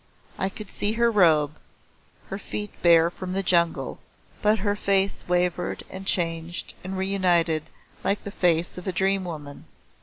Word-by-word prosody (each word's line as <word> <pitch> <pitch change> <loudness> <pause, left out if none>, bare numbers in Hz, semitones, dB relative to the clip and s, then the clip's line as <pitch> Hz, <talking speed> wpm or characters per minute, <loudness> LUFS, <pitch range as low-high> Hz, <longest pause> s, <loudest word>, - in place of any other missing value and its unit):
I 190 - +1
could 210 +1 -9
see 205 +1 0
her 235 +1 +3
robe, 160 -8 +4 0.8
her 195 - -3
feet 210 +1 -5
bare 170 -1 +6
from 185 0 -6
the 195 +1 -1
jungle, 170 -2 +1 0.4
but 210 +1 +4
her 205 0 0
face 195 -1 +1
wavered 180 0 0
and 190 +1 -8
changed 165 -1 -1
and 190 +1 -4
re 190 - 0
united 175 -5 +2 0.4
like 200 +1 0
the 200 - -6
face 175 -2 +1
of 180 - -10
a - - +1
dream 195 +1 +1
woman. 150 -4 -7
185 Hz, 160 wpm, -25 LUFS, 170-195 Hz, 0.8 s, bare